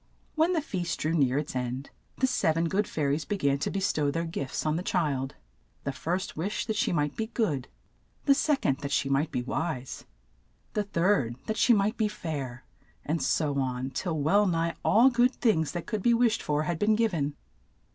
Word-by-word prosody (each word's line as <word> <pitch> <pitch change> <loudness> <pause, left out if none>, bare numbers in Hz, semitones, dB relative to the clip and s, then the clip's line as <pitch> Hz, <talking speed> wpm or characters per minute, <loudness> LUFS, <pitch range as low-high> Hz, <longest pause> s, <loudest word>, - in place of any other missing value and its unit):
When 325 +3 +2
the 320 -4 0
feast 175 - -3
drew 155 +2 0
near 135 -5 +2
its 145 -2 -3
end 125 +2 -3 0.3
the 260 - +3
sev 160 -10 +1
en 165 - +2
good 195 +5 0
fai 155 - -3
ries 145 +3 +1
be 205 - -2
gan 140 -5 +1
to - - -1
be 195 - -2
stow 155 -7 +1
their 165 +3 -1
gifts 140 -5 -4
on 155 0 +1
the 170 - -1
child. 145 -8 -1 0.5
The 140 - -1
first 180 +7 -3
wished 190 +5 -2
that 220 - -2
she - - +1
might 150 -3 0
be 220 - -2
good: 170 - -1 0.6
the 280 - +6
sec 290 0 +1
ond, 135 - +2
that 140 -1 -5
she 135 - +1
might 140 +3 +2
be 125 - -1
wise; 135 0 -3 0.7
the 210 - +1
third, 170 - +1
that 220 - -2
she 240 - +5
might 210 +3 +1
be 220 - +2
fair, 145 -11 -5 0.4
and 160 +2 -1
so 145 -3 +1
on, 130 0 -2
till 160 +4 -2
well 200 +8 +3
nigh 165 -1 0
all 245 +5 +5
good 245 +1 +3
things 160 - +2
that 175 -2 -4
could 215 -3 -3
be 235 +4 +4
wished 230 -1 +2
for 150 0 0
had 160 +1 -2
been 215 +1 +3
giv 225 -2 +1
en. 145 -3 -1
165 Hz, 215 wpm, -28 LUFS, 140-210 Hz, 0.7 s, the